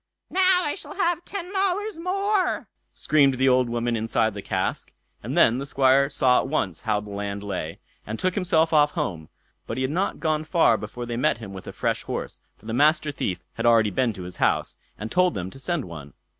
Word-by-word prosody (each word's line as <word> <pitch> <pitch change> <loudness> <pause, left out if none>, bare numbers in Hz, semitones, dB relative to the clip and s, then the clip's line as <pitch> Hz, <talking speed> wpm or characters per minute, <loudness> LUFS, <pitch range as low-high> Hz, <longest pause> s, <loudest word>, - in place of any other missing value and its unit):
"Now 370 -1 +4
I 295 - -1
shall 390 - -9
have 350 -3 0
ten 385 -1 -6
dollars 395 0 0
more!" 390 +2 0 0.2
screamed 140 -3 +3
the 130 +1 +2
old 125 -1 +3
woman 120 0 -1
inside 110 -1 0
the 100 - -6
cask; 95 -1 -2 0.3
and - - -4
then 120 +3 +5
the 140 - -4
Squire 135 +1 +3
saw 130 -3 +3
at - - -2
once 100 - -1
how 105 -3 0
the 105 -1 -10
land 100 0 -4
lay, 90 -5 -4 0.3
and 110 +1 -5
took 185 +6 0
himself 165 -4 +2
off 150 -1 +4
home; 80 -5 -3 0.4
but 115 - -4
he 130 - 0
had 130 - -1
not 185 +5 -1
gone 155 -1 0
far 155 -7 +3
before 110 +3 -6
they 120 -1 -4
met 125 - +2
him 105 -4 -9
with 95 - -9
a - - -5
fresh - - -1
horse, - - -5 0.2
for - - -22
the 110 - -4
Master 150 +3 +3
Thief 95 -9 -3
had - - -1
already 115 -3 +4
been 120 +5 +1
to 95 -3 -8
his 90 0 -8
house, - - +1 0.2
and 110 +2 -6
told 180 +3 +3
them 95 0 -4
to 135 - -10
send 150 +1 -2
one. 75 -4 -10
130 Hz, 220 wpm, -24 LUFS, 105-175 Hz, 0.4 s, then